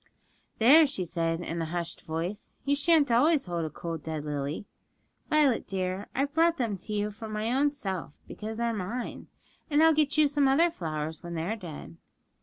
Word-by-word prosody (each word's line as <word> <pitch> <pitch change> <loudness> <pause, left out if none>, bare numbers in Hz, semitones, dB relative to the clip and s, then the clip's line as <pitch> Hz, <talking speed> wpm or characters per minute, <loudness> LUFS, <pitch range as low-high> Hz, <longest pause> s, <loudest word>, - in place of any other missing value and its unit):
'There,' 290 +8 +7
she 195 -10 -2
said 165 -1 -1
in 170 -1 -3
a - - -1
hushed 170 +1 -3
voice; 170 +6 -5
'you 285 +1 +3
shan't 295 -2 +4
always 290 +5 +4
hold 175 -2 -2
a 160 - -2
cold 165 +1 -5
dead 155 -1 -5
lily, 145 +4 -3 0.6
Violet 295 -6 +3
dear; 185 +1 -3
I've 280 +2 0
brought 330 +1 +3
them 230 -6 -1
to 195 - -10
you 210 0 -1
from 215 +1 -8
my 215 +2 -1
own 285 +2 +3
self, 190 - -5
because 220 +1 -6
they're 235 0 0
mine, 220 +5 -5 0.4
and 300 +1 +4
I'll 320 0 +7
get 300 -1 +1
you 305 -1 +6
some 285 -1 +2
other 325 +6 +4
flowers 155 - -4
when 170 0 -6
they 160 - -2
are 210 +6 -1
dead.' 160 - -9
210 Hz, 195 wpm, -28 LUFS, 170-280 Hz, 0.6 s, There